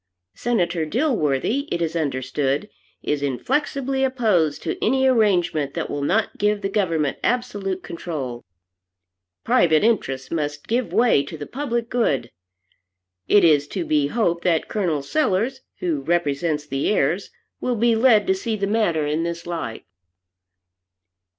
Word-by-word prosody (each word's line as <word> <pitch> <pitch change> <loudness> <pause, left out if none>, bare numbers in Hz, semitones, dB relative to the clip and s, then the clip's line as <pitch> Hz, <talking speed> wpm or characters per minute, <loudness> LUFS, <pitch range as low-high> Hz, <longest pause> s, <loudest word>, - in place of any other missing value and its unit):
Senator 175 -8 0
Dilworthy, 225 - 0
it 170 - 0
is 165 -1 -2
understood, 140 +3 -1 0.3
is 150 -1 -1
inflexibly 265 - -1
opposed 215 - +1
to 160 - -3
any 265 +3 +2
arrangement 190 - +2
that - - -3
will 145 - -3
not 215 +10 0
give 210 0 +1
the 195 - -1
government 165 -8 0
absolute 205 -7 -1
control. 140 -8 -5 1.0
Private 160 -1 +3
interests 135 - 0
must 150 -2 -3
give 240 +1 0
way 235 - +4
to 145 +3 -7
the 145 - -6
public 240 - -3
good. 185 - 0 1.0
It 205 - +5
is 150 -4 +4
to 175 +2 -4
be 150 -2 +2
hoped 170 -3 0
that 165 -3 +1
Col. 170 -9 -1
Sellers, 255 - 0 0.2
who 160 -6 -1
represents 150 -1 0
the 135 -1 -1
heirs, 180 -1 +1 0.3
will 250 -1 -1
be 230 +1 +3
led 225 -3 +5
to 190 - +3
see 215 +4 -2
the 200 -1 -1
matter 195 -8 +1
in 150 +2 0
this 170 0 -4
light." 165 -10 -5
175 Hz, 140 wpm, -22 LUFS, 150-225 Hz, 1.0 s, It